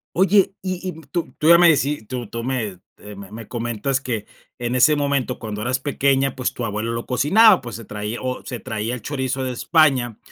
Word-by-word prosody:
Oye, 195 +2 +4
y 185 0 -4
y 160 -3 -7
tú 170 -2 -2
tú 155 - +2
ya 170 - +9
me 175 -1 +7
deci 145 -4 +2
tú 120 0 -5
tú 115 +2 -6
me 115 -8 -3 0.2
eh, 105 0 -11
me 100 0 -11
me 110 0 -9
comentas 120 +3 -2
que, 115 -6 -4 0.3
en 120 +1 -2
ese 150 +4 +5
momento 140 -3 -1
cuando 105 -2 -5
eras 125 +2 0
pequeña, 135 -1 +1
pues, 130 - -1
tu 120 - -5
abuelo 105 +2 -3
lo 115 0 -4
cocinaba, 190 - +5
pues, 120 -4 -7
se 115 - -9
traía 105 +3 -5
o 130 0 -4
se 125 -3 -5
traía 110 -1 -3
el 120 - -8
chorizo 130 -1 -2
de 130 - -2
España 130 -5 +2
125 Hz, 215 wpm, -21 LUFS, 115-145 Hz, 0.3 s, ya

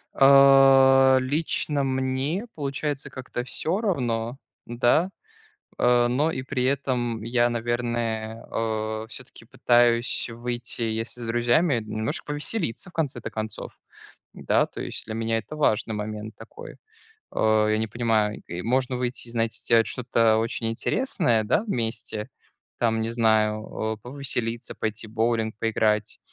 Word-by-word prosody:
А, 135 -1 +7
лично 145 +1 0
мне, 130 - -1
получается, 145 -1 -3
как-то 125 -2 -6
всё 165 - -2
равно, 120 - -1 0.3
да? 120 +9 +2 0.7
А, 120 0 +4
но 145 +6 +1
и 130 - -3
при 130 -1 -2
этом 125 -4 -1
я, 120 +1 +2
наверное, 115 -1 -2
о, 110 -1 -2
всё-таки - - -11
пытаюсь 120 0 +2
выйти, 120 +1 -4
если 115 +2 -3
с 115 - -5
друзьями, 120 +5 +2
немножко 110 0 -3
повеселиться, 150 - -3
в - - -31
конце-то 145 -8 -3
концов. 110 0 -6 0.6
Да, - - +1
то - - -8
есть - - -5
для 110 - -6
меня 115 0 0
это 155 - -9
важный 110 -7 +1
момент 105 +1 -5
такой. 480 +2 -11 0.6
Э, 110 -1 +3
я 110 - +2
не 110 - 0
понимаю, 110 -2 0 0.2
можно 125 +2 0
выйти 125 -1 -3
и, - - -10
знаете, 115 -1 -1
сделать 115 -1 +3
что-то 115 -3 +2
очень 115 0 -1
интересное, 120 - +1
да, 110 - +1
вместе. 115 - -3 0.5
Там, 115 -1 +1
не 115 - -2
знаю, 110 -2 +2 0.3
а, 110 - -9
повеселиться, 120 -1 -4
пойти 110 0 -4
в - - -15
боулинг 115 -1 0
поиграть. 110 -2 0
120 Hz, 135 wpm, -25 LUFS, 110-135 Hz, 0.7 s, А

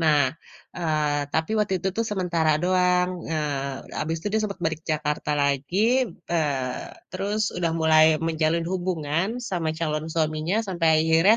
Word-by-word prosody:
nah, 155 -2 +4 0.6
eee, 150 -4 0
tapi 160 +3 0
waktu 200 -2 +1
itu 190 - 0
tuh 230 - +1
sementara 170 -5 +1
doang, 180 0 +3 0.2
eee, 140 -3 -3
habis 160 +1 -1
itu 205 - -2
dia 220 - +2
sempet 200 -3 -5
balik 160 0 -2
Jakarta 150 0 -2
lagi, 140 +6 0 0.5
eee, 135 -6 -1 0.2
terus 200 +3 -2 0.2
udah 170 -2 0
mulai 155 0 +6 0.2
menjalin 160 +1 +1
hubungan 175 -1 -1 0.2
sama 170 -4 -1
calon 155 -1 -1
suaminya 155 +3 0
sampai 170 -4 +1
akhirnya, 165 +7 +5
160 Hz, 145 wpm, -25 LUFS, 155-180 Hz, 0.6 s, mulai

